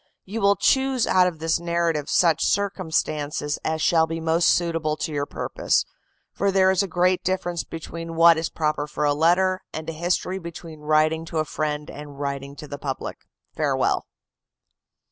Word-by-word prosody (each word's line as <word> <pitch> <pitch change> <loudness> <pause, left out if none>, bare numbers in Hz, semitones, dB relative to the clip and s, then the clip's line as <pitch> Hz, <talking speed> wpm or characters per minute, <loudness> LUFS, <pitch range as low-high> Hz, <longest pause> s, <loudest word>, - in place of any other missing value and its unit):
You 215 +4 -4
will 200 0 +4
choose 265 +3 +2
out 185 -1 +4
of 175 -3 -3
this 160 +1 0
narrative 170 -3 -1
such 165 -3 +3
circumstances 160 -7 -1
as 160 0 -1
shall 160 -1 +4
be 165 0 -4
most 165 +1 +2
suitable 165 -3 +1
to 155 - -3
your 145 -1 -2
purpose; - - 0 0.5
for 200 - 0
there 190 -1 +4
is 190 0 +2
a 195 - -1
great 180 0 +1
difference 175 -2 -1
between 165 0 -7
what 165 0 +7
is 160 0 -2
proper 150 -2 -1
for 150 0 -2
a 145 - +3
letter 180 +5 +2
and 155 0 -6
a 165 - -3
history: 180 +3 -1
between 170 -2 -9
writing 155 +1 +2
to 165 - -5
a 155 - +1
friend 150 -1 -3
and 145 -1 -10
writing 140 0 -4
to 150 - -9
the 145 0 -7
public. 135 -2 -5 0.3
Farewell." - - 0
165 Hz, 175 wpm, -24 LUFS, 150-180 Hz, 0.5 s, what